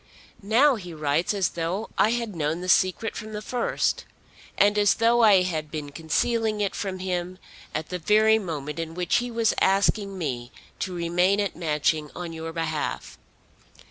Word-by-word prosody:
Now 240 +7 +4
he 180 -5 -9
writes 150 +2 0
as 200 -3 +1
though 175 +6 -3
I 215 - +4
had 230 -4 -2
known 160 +2 -1
the 180 - -5
secret 185 +5 +2
from 215 0 -7
the 210 - -4
first, 245 +2 -1 0.5
and 205 +1 +4
as 205 -1 +4
though 235 +1 +3
I 200 -5 +6
had 160 -4 -3
been 150 -2 -6
concealing 215 +8 0
it 200 -2 0
from 190 -2 -4
him 185 -1 -3 0.4
at 155 0 -3
the 180 - -4
very 215 +5 +4
moment 155 -5 -5
in 165 0 -5
which 180 -1 +1
he 245 0 -2
was 230 -1 +1
asking 195 +1 +2
me 125 -7 -4 0.3
to 185 -2 -3
remain 175 +3 +2
at 200 -2 -1
Matching 150 -1 0
on 175 -2 -6
your 165 0 -6
behalf. 160 -2 -3
185 Hz, 175 wpm, -25 LUFS, 160-210 Hz, 0.5 s, I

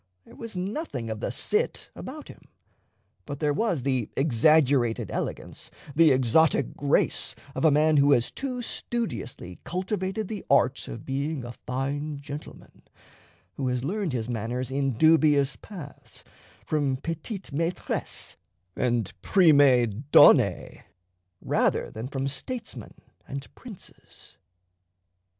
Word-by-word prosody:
There - - -16
was 230 -5 -7
nothing 185 - -4
of 110 - -4
the - - -2
Cit - - -1
about - - -8
him; - - -14 0.8
but 140 0 -5
there 150 -2 +1
was 175 - 0
the 130 -5 0
exaggerated 135 -3 +3
elegance, - - -5 0.3
the 165 0 +6
exotic 130 +2 +3
grace, 145 0 +1 0.2
of - - -3
a - - +7
man 155 +1 +4
who 140 0 +5
has 120 -3 +1
too 255 -3 -4
studiously 220 - -4
cultivated 190 +2 -3
the 215 0 -5
art 140 -1 +3
of 115 - -8
being 140 +1 -2
a 120 - -6 0.2
fine 140 +3 -2
gentleman; 145 +1 -10 0.8
who 135 - -1
has 125 -1 -1
learned 185 0 -2
his 115 -3 -2
manners 120 +2 -3
in 135 -1 0
dubious 150 0 +4
paths, 165 -9 -11 0.4
from 140 -2 0
petites 165 - -6
maîtresses 165 +5 -3 0.4
and 120 -5 0
prime 140 - +4
donne, - - +5 0.6
rather - - 0
than 110 +3 -6
from 135 0 -3
statesmen 140 - -6 0.3
and 140 0 -7
princes. 230 -7 -13
140 Hz, 125 wpm, -26 LUFS, 125-165 Hz, 0.8 s, a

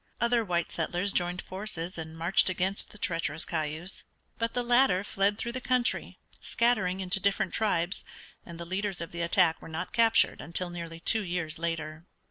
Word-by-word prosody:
Other 235 0 +3
white 175 -4 -1
settlers 175 +4 -1
joined 175 0 0
forces 185 -2 -4
and 160 -1 -7
marched 170 +4 +4
against 185 +2 -1
the - - -9
treacherous 165 -3 -1
Cayuse, 160 +3 -4 0.4
but 230 0 -1
the 245 - +1
latter 240 -6 +4
fled 200 0 +1
through 235 +1 -3
the 255 +1 -5
country, 250 -1 0 0.2
scattering 200 -6 +1
into 185 +1 +3
different 200 +1 +1
tribes, 190 -4 0 0.4
and 170 -1 -10
the 170 - -5
leaders 190 +1 -1
of 170 - -5
the 170 - -4
attack 170 -1 +3
were - - -10
not 160 0 -4
captured 230 0 +4
until 175 +3 -3
nearly 170 -1 -6
two 220 +6 +3
years 175 -4 -2
later. 165 0 -3
180 Hz, 175 wpm, -29 LUFS, 170-205 Hz, 0.4 s, marched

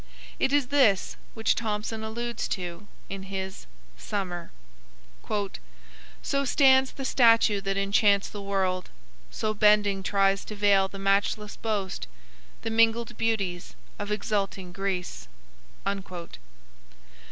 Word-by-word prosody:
It - - +2
is 285 -3 +2
this 250 -10 +3 0.2
which 225 -1 +2
Thomson 220 0 -3
alludes 235 +2 -3
to 180 +2 -7 0.2
in 195 0 -6
his 190 - -6 0.3
"Summer": 180 -4 -4 1.7
"So 275 0 0
stands 265 -1 +5
the 270 - -6
statue 230 -5 +4
that 195 0 -2
enchants 200 0 +3
the 205 - -8
world; 190 -2 -1 0.4
So 215 -1 -2
bending 210 -2 +4
tries 195 0 +2
to 215 - -7
veil 200 -2 +4
the 195 - -10
matchless 200 +2 0
boast, 200 - -3 0.6
The 225 - -2
mingled 230 +1 +2
beauties 200 -6 -2 0.2
of 205 0 -4
exulting 200 -3 -2
Greece." 180 - -3
205 Hz, 110 wpm, -27 LUFS, 195-225 Hz, 1.7 s, stands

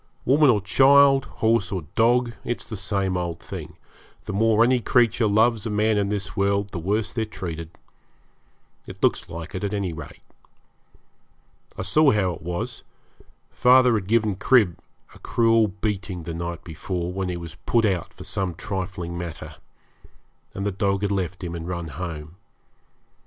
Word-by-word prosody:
Woman 145 +2 +5
or 105 -5 +3
child, 135 +6 +5
horse 110 -4 0
or 95 -4 -3
dog, 120 +2 +3
it's 120 - -3
the 110 - -6
same 95 -1 -1
old 85 -2 -3
thing - - -8 0.5
the 105 - -5
more 110 +2 +4
any 125 +1 +3
creature 115 -1 +2
loves 110 +1 +2
a - - -3
man 105 +1 +2
in 100 -1 0
this 100 -2 -3
world 100 0 +1
the 90 - -4
worse 105 +6 -1
they're 115 - -1
treated. 85 -6 -6 1.2
It - - -10
looks - - +1
like 85 +1 -7
it, 95 - -4
at 100 0 -1
any 95 -4 -2
rate. 80 -2 -10 1.5
I - - -3
saw 145 +10 +4
how 100 -6 +2
it - - -10
was; 105 +8 -4 0.7
father 125 0 +5
had 105 -4 -1
given 110 -3 +1
Crib 105 -5 +3 0.3
a - - -15
cruel 115 -1 +3
beating 100 -2 -4
the 85 +1 -5
night 85 -1 -5
before, 85 +2 -4
when 95 -1 -2
he 90 - -3
was 85 -2 -8
put 115 -2 +3
out 95 -5 -1
for - - -12
some 95 -3 -2
trifling 90 -2 -4
matter, 80 -3 -7 1.0
and 100 - -3
the 105 - 0
dog 100 +1 0
had 100 - 0
left 95 -1 -2
him 85 -1 -4
and 85 0 -6
run 85 -2 -4
home. 80 +1 -7
100 Hz, 170 wpm, -24 LUFS, 90-110 Hz, 1.5 s, Woman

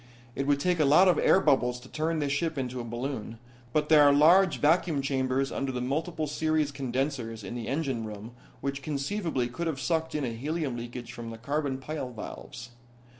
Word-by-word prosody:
It 135 +2 -3
would 145 -1 +3
take 180 +2 +1
a - - +5
lot 155 +7 +6
of 180 - +4
air - - +5
bubbles 125 -6 +2
to 125 - -13
turn 160 +4 -1
this 145 -2 -1
ship 160 +2 -1
into 125 -1 -3
a - - -4
balloon, 120 -1 -5 0.3
but 150 +3 +1
there 155 -1 +7
are 145 -1 +7
large 170 +6 +5
vacuum 155 -2 +2
chambers 135 0 0
under 135 -1 -2
the 125 - -3
multiple 155 +6 -2
series 155 0 0
condensers 130 -4 -3
in - - -6
the 120 -2 -5
engine 135 -4 -1
room 105 +2 -8 0.3
which 140 0 -3
conceivably 150 -1 -2
could 165 +8 -4
have 150 -5 -2
sucked 160 +2 -1
in 150 - -1
a 120 - -3
helium 145 +2 -2
leakage 120 0 -7
from 115 -1 -7
the 115 - -7
carbon 140 +2 -2
pile 135 -1 -5
valves. 120 +1 -8
140 Hz, 200 wpm, -28 LUFS, 125-155 Hz, 0.3 s, there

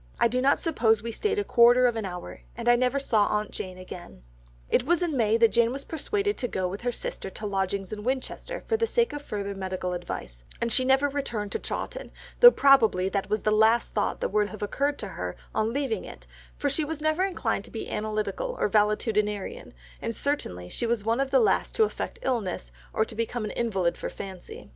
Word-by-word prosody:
I - - +5
do 250 +2 0
not 275 +2 +3
suppose 225 - +2
we 230 - -3
stayed 420 - -1
a 410 - +1
quarter 245 -4 +6
of 240 -2 +2
an 220 -2 -2
hour, 180 -2 -7 0.2
and 235 0 -5
I 240 - +7
never 255 +3 +1
saw 220 -6 +2
aunt 210 0 -1
Jane 185 -1 -6
again." 175 - -10 0.4
It 250 - +2
was 345 +5 +2
in 325 -4 -1
May 225 -3 +3
that 230 -1 +5
Jane 235 0 +3
was 275 +2 -4
persuaded 410 +7 -1
to 245 - -1
go 185 -5 -1
with 195 +3 -6
her 245 0 0
sister 210 - -5
to 215 - -7
lodgings 195 0 -2
in 210 -1 -6
Winchester 265 - -3
for 450 - -1
the 455 0 +1
sake 470 -3 +1
of 290 - -5
further 200 -7 -4
medical 185 -1 -3
advice, 65 - -6 0.2
and 235 0 -1
she 255 - +4
never 265 +2 +4
returned 240 -8 -3
to - - -2
Chawton, - - -5 0.3
though 485 - +12
probably 230 - +4
that 200 0 -2
was 215 -1 0
the 215 - +2
last 220 +2 +3
thought 205 - -1
that - - 0
would 210 0 +1
have 215 -1 -7
occurred 280 +7 0
to 205 - -5
her 90 - -5 0.2
on 220 +1 +1
leaving 270 -3 -1
it, - - -11 0.3
for 290 - -1
she 285 +3 0
was 310 +1 -4
never 310 +4 +1
inclined 385 -1 -1
to - - -13
be - - -6
analytical 215 - -2
or - - +2
valetudinarian, 210 -1 0 0.3
and 230 - -3
certainly 90 - -2
she 235 - -2
was 230 -3 0
one 230 +3 +1
of 275 0 +1
the - - +4
last 445 - +2
to 445 - +5
affect 430 - -3
illness, 200 - -2 0.2
or 220 - +1
become 230 +1 -3
an - - -4
invalid 195 -7 0
for - - -5
fancy. 190 - -9
230 Hz, 220 wpm, -27 LUFS, 205-275 Hz, 0.4 s, though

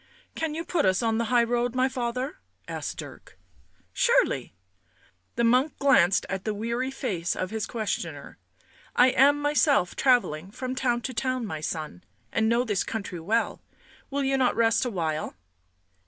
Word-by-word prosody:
" - - -35
Can 315 -2 -1
you 330 +1 -4
put 340 -4 0
us 185 +3 +2
on 225 0 +1
the 235 - 0
high 240 +1 +3
road, 240 +1 0
my 255 +1 +3
father?" 250 +2 -3 0.3
asked - - -5
Dirk. - - -10 0.3
" - - -38
Surely!" - - +2 0.8
The 235 - +1
monk 250 +6 +3
glanced 195 -10 +4
at 190 -1 -4
the 215 -1 -2
weary 235 +5 -2
face 190 - -2
of 185 +1 -3
his 220 -2 -3
questioner. 220 -4 -4 0.3
" - - -29
I 250 +1 +6
am 280 +3 +5
myself 290 - +2
travelling 195 - +2
from 255 +4 -5
town 245 -2 0
to 260 - -5
town, 255 0 -1
my 155 -7 -5
son. 155 - -5 0.3
And 220 0 +1
know 235 +1 +3
this 205 -6 0
country 195 -5 -5
well. 220 +8 -1 0.5
Will 280 0 -1
you 270 0 +1
not 255 - +2
rest 230 +2 +3
a - - 0
while?" 160 -7 -3
235 Hz, 175 wpm, -26 LUFS, 205-260 Hz, 0.8 s, I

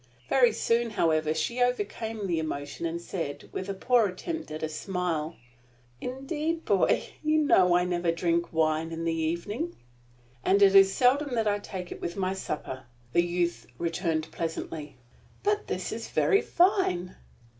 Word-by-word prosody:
Very 245 -3 +5
soon, 230 +2 +1
however, 160 -7 +1
she 160 +11 -1
overcame 225 -2 -1
the 170 -4 0
emotion, 150 +1 -3
and 165 +1 -3
said, 165 -4 -5
with 190 - -5
a 195 - -2
poor 240 +2 +3
attempt 320 - -5
at 155 +1 -6
a - - +1
smile: 165 -1 -2 0.7
"Indeed, 300 +6 -3
boy, 200 -3 +3 0.2
you 310 0 +3
know 185 - +5
I 180 0 +3
never 175 -1 0
drink 170 0 0
wine 160 0 +1
in 165 0 -4
the 165 - +1
evening." 170 - -2 0.7
"And 200 +1 +4
it 195 -1 +6
is 195 -1 +8
seldom 260 +4 +2
that 225 -2 +1
I 205 0 +1
take 185 -3 -7
it - - -7
with 170 - -4
my 190 -1 0
supper," 140 -8 -5 0.3
the 170 - +5
youth 175 -9 -1
returned, 165 -2 -1
pleasantly. 160 -3 -5 0.5
"But 415 +1 +1
this - - -3
is - - -5
very 400 - +3
fine." 345 - +2
180 Hz, 160 wpm, -28 LUFS, 165-235 Hz, 0.7 s, is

